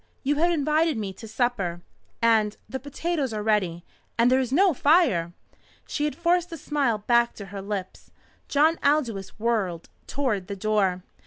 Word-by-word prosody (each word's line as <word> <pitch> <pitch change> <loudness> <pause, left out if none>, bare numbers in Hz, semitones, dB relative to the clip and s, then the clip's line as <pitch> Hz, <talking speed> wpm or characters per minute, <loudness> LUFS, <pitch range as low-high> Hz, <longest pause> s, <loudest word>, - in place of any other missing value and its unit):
You 290 +1 +1
have 340 +3 +3
invited 310 -1 +1
me 200 -3 -4
to 225 +4 -11
supper. 220 -7 -1 0.4
And 220 -2 +3
the 265 - -5
potatoes 285 -1 -2
are 210 -1 -3
ready, 185 -6 0 0.3
and 235 +2 +4
there 260 - +4
is 255 -2 -2
no 365 +5 +4
fire!" 280 - +3 0.6
She 295 - -1
had 300 - -2
forced 345 +2 +1
a 330 - -5
smile 280 -7 0
back 235 +3 +2
to 200 - -8
her 200 - -5
lips. 195 -2 -6 0.4
John 310 +3 +3
Aldous 240 -10 0
whirled 210 -7 -1 0.2
toward 225 -10 -1
the 200 - -4
door. 195 -3 0
235 Hz, 165 wpm, -25 LUFS, 205-295 Hz, 0.6 s, and